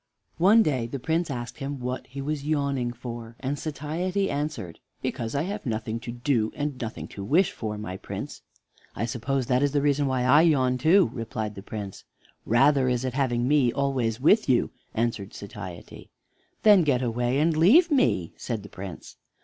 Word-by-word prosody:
One 210 Hz, +6 st, +6 dB
day 130 Hz, -, 0 dB
the 140 Hz, -, -4 dB
Prince 160 Hz, +5 st, -1 dB
asked 120 Hz, -2 st, -5 dB
him 140 Hz, 0 st, -4 dB
what 125 Hz, +1 st, -4 dB
he 135 Hz, +2 st, -7 dB
was 145 Hz, 0 st, -3 dB
yawning 140 Hz, -5 st, 0 dB
for, 120 Hz, -1 st, -8 dB
and 140 Hz, +2 st, -3 dB
Satiety 170 Hz, +6 st, -2 dB
answered: 145 Hz, -, -4 dB, 0.2 s
"Because 115 Hz, +1 st, -3 dB
I 140 Hz, -, +1 dB
have 200 Hz, +4 st, -4 dB
nothing 110 Hz, -1 st, -3 dB
to 120 Hz, 0 st, -6 dB
do, 120 Hz, -2 st, 0 dB
and 145 Hz, -3 st, -3 dB
nothing 115 Hz, -1 st, -5 dB
to 100 Hz, -, -7 dB
wish 165 Hz, -, +3 dB
for, 105 Hz, -2 st, -5 dB
my 95 Hz, -3 st, -5 dB
Prince." -, -, -7 dB, 0.5 s
"I -, -, -1 dB
suppose 130 Hz, +3 st, -2 dB
that 125 Hz, +1 st, +2 dB
is 145 Hz, -1 st, +1 dB
the 145 Hz, -, +2 dB
reason 145 Hz, -1 st, +2 dB
why 130 Hz, -2 st, 0 dB
I 140 Hz, +5 st, +6 dB
yawn 130 Hz, -6 st, +3 dB
too," 175 Hz, +6 st, +4 dB
replied 110 Hz, -3 st, -4 dB
the 100 Hz, -, -9 dB
Prince. 100 Hz, -1 st, -7 dB, 0.4 s
"Rather 135 Hz, +3 st, +4 dB
is 125 Hz, 0 st, 0 dB
it 130 Hz, -, -2 dB
having 125 Hz, -3 st, 0 dB
me 140 Hz, -4 st, +3 dB
always 130 Hz, -4 st, -1 dB
with 180 Hz, -, +4 dB
you,".answered 115 Hz, -4 st, -1 dB
Satiety. 95 Hz, -3 st, -9 dB, 0.5 s
"Then 210 Hz, -3 st, +7 dB
get 135 Hz, -6 st, +1 dB
away 120 Hz, +2 st, 0 dB
and 160 Hz, +2 st, +2 dB
leave 270 Hz, -, +6 dB
me," 250 Hz, -, +2 dB
said 115 Hz, -5 st, -4 dB
the 105 Hz, -, -11 dB
Prince. 95 Hz, -3 st, -9 dB
130 Hz, 180 wpm, -26 LUFS, 115-150 Hz, 0.5 s, Then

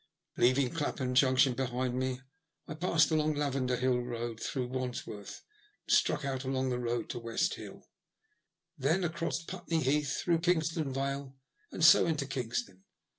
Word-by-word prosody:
Leaving 130 Hz, +1 st, +3 dB
Clapham 145 Hz, -5 st, -2 dB
Junction 130 Hz, 0 st, +4 dB
behind 125 Hz, 0 st, -2 dB
me, 130 Hz, 0 st, -2 dB, 0.5 s
I -, -, -5 dB
passed 165 Hz, 0 st, +2 dB
along 155 Hz, -1 st, +2 dB
the -, -, -3 dB
Lavender 130 Hz, -3 st, 0 dB
Hill 125 Hz, +1 st, +1 dB
Eoad, 120 Hz, -2 st, -4 dB
through 125 Hz, -3 st, -3 dB
Wandsworth, 125 Hz, -5 st, -5 dB, 0.4 s
and -, -, +1 dB
struck 150 Hz, -, +1 dB
out 135 Hz, -1 st, -2 dB
along 130 Hz, 0 st, -1 dB
the 125 Hz, -1 st, -1 dB
road 120 Hz, 0 st, -2 dB
to 120 Hz, -, -5 dB
West 115 Hz, +10 st, 0 dB
Hill, -, -, -9 dB, 0.9 s
then 160 Hz, +5 st, +1 dB
across 170 Hz, 0 st, -2 dB
Putney 175 Hz, -2 st, -3 dB
Heath, 140 Hz, +1 st, +1 dB
through 170 Hz, -2 st, +2 dB
Kingston 165 Hz, -3 st, 0 dB
Vale, 135 Hz, 0 st, -3 dB, 0.4 s
and 160 Hz, -, +1 dB
so 160 Hz, -, +8 dB
into 155 Hz, -4 st, 0 dB
Kingston. 120 Hz, -8 st, -4 dB
135 Hz, 155 wpm, -31 LUFS, 125-155 Hz, 0.9 s, so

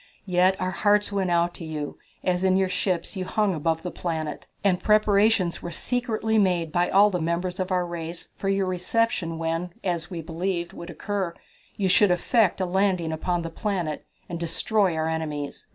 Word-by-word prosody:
Yet 185 Hz, 0 st, +3 dB
our 185 Hz, -, -1 dB
hearts 205 Hz, +2 st, +2 dB
went 195 Hz, -2 st, 0 dB
out 175 Hz, 0 st, +2 dB
to -, -, -9 dB
you, 155 Hz, -2 st, -5 dB, 0.2 s
as 180 Hz, 0 st, +1 dB
in 190 Hz, 0 st, +4 dB
your 190 Hz, -1 st, +2 dB
ships 185 Hz, 0 st, -1 dB
you 190 Hz, -, -2 dB
hung 205 Hz, +1 st, +1 dB
above 160 Hz, 0 st, -1 dB
the 180 Hz, -, -4 dB
planet, 160 Hz, -4 st, -4 dB, 0.2 s
and 185 Hz, -3 st, +2 dB
preparations 210 Hz, -3 st, +3 dB
were 175 Hz, -, -5 dB
secretly 225 Hz, +1 st, 0 dB
made 175 Hz, -5 st, +2 dB
by 175 Hz, +2 st, +2 dB
all 205 Hz, +2 st, +6 dB
the 180 Hz, -3 st, -1 dB
members 170 Hz, +3 st, -1 dB
of 185 Hz, 0 st, -2 dB
our 180 Hz, -1 st, +2 dB
race 170 Hz, 0 st, -5 dB
for 195 Hz, -, -2 dB
your 195 Hz, 0 st, +2 dB
reception 185 Hz, -1 st, 0 dB
when, 165 Hz, +2 st, -2 dB
as 175 Hz, -2 st, -2 dB
we 170 Hz, -4 st, -5 dB
believed, 170 Hz, +1 st, -2 dB
would 170 Hz, -, -8 dB
occur, 190 Hz, -3 st, -3 dB, 0.4 s
you 195 Hz, -, 0 dB
should 200 Hz, +2 st, +5 dB
effect 190 Hz, +3 st, +2 dB
a 185 Hz, -, +1 dB
landing 185 Hz, -3 st, +1 dB
upon 170 Hz, +2 st, -1 dB
the 165 Hz, -, -5 dB
planet 175 Hz, -5 st, -3 dB, 0.2 s
and 170 Hz, -1 st, -5 dB
destroy 180 Hz, +2 st, +1 dB
our 160 Hz, 0 st, 0 dB
enemies." 150 Hz, -3 st, -4 dB
180 Hz, 185 wpm, -25 LUFS, 170-195 Hz, 0.4 s, all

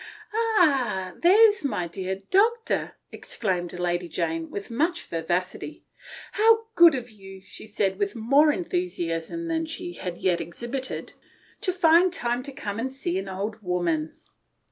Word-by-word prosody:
" -, -, -24 dB
Ah! 280 Hz, -, +2 dB
there 405 Hz, +6 st, +7 dB
is 415 Hz, -, -6 dB
my 180 Hz, -11 st, -1 dB
dear 190 Hz, +3 st, -5 dB
doctor," 450 Hz, +4 st, +2 dB, 0.2 s
exclaimed 180 Hz, -5 st, -3 dB
Lady 175 Hz, 0 st, -1 dB
Jane, 165 Hz, -1 st, -2 dB
with 200 Hz, +3 st, -6 dB
much 325 Hz, +9 st, 0 dB
vivacity. 175 Hz, +3 st, -3 dB, 0.2 s
" -, -, -13 dB
How 445 Hz, +1 st, +4 dB
good 340 Hz, -6 st, +7 dB
of 245 Hz, -2 st, -5 dB
you," 195 Hz, -2 st, -12 dB
she 190 Hz, +3 st, -10 dB
said, 200 Hz, -2 st, -1 dB
with 200 Hz, +1 st, -1 dB
more 275 Hz, +7 st, +4 dB
enthusiasm 335 Hz, -, -3 dB
than 325 Hz, -1 st, -1 dB
she 350 Hz, +2 st, -5 dB
had 180 Hz, -, -6 dB
yet 175 Hz, -2 st, +1 dB
exhibited, 240 Hz, +10 st, -5 dB, 0.2 s
" -, -, -31 dB
to 370 Hz, -, +1 dB
find 350 Hz, 0 st, +5 dB
time 240 Hz, -6 st, -1 dB
to 280 Hz, +2 st, -8 dB
come 205 Hz, -5 st, -5 dB
and 260 Hz, +3 st, -2 dB
see 190 Hz, -9 st, -2 dB
an 195 Hz, 0 st, -6 dB
old 205 Hz, +3 st, -4 dB
woman." 175 Hz, -4 st, -1 dB
225 Hz, 160 wpm, -25 LUFS, -, 0.2 s, there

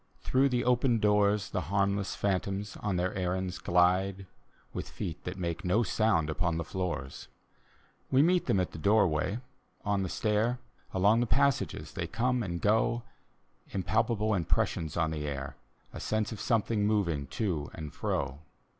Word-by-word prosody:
Through 135 Hz, +2 st, +3 dB
the 125 Hz, -1 st, 0 dB
open 125 Hz, -1 st, +3 dB
doors 105 Hz, -1 st, +2 dB
The -, -, -1 dB
harmless 100 Hz, 0 st, +1 dB
phantoms 100 Hz, +1 st, -1 dB
on 105 Hz, -3 st, -2 dB
their 90 Hz, +1 st, 0 dB
errands 90 Hz, -1 st, -2 dB
glide. 90 Hz, +3 st, +2 dB, 0.5 s
With -, -, -5 dB
feet 80 Hz, -, -5 dB
that 90 Hz, +2 st, -4 dB
make 85 Hz, -3 st, -3 dB
no 100 Hz, +6 st, +2 dB
sound 105 Hz, -6 st, +2 dB
upon 85 Hz, +1 st, 0 dB
the 85 Hz, -, -1 dB
floors. 85 Hz, -6 st, -4 dB, 0.8 s
We 135 Hz, +2 st, +5 dB
meet 180 Hz, +2 st, +3 dB
them 100 Hz, -, +3 dB
at 90 Hz, -, -1 dB
the -, -, -8 dB
doorway, 100 Hz, 0 st, +2 dB, 0.5 s
on 100 Hz, -1 st, +1 dB
the 95 Hz, -, -2 dB
stair, 110 Hz, +5 st, +1 dB, 0.3 s
Along 100 Hz, +5 st, +4 dB
the 120 Hz, -, +1 dB
passages 135 Hz, -, +1 dB
they -, -, -3 dB
come 125 Hz, +2 st, 0 dB
and 85 Hz, -5 st, -3 dB
go. 110 Hz, +4 st, +2 dB, 0.7 s
Impalpable 110 Hz, +3 st, +1 dB
impressions 80 Hz, -3 st, 0 dB
on 80 Hz, -2 st, +1 dB
the 75 Hz, -1 st, -3 dB
air, 70 Hz, -2 st, -4 dB, 0.4 s
A -, -, -6 dB
sense 110 Hz, 0 st, -1 dB
of 110 Hz, -, -6 dB
something 110 Hz, -2 st, +1 dB
moving 85 Hz, -10 st, 0 dB
to 80 Hz, -, -2 dB
and 75 Hz, -3 st, -7 dB
fro. 70 Hz, +1 st, -2 dB
100 Hz, 155 wpm, -30 LUFS, 85-110 Hz, 0.8 s, We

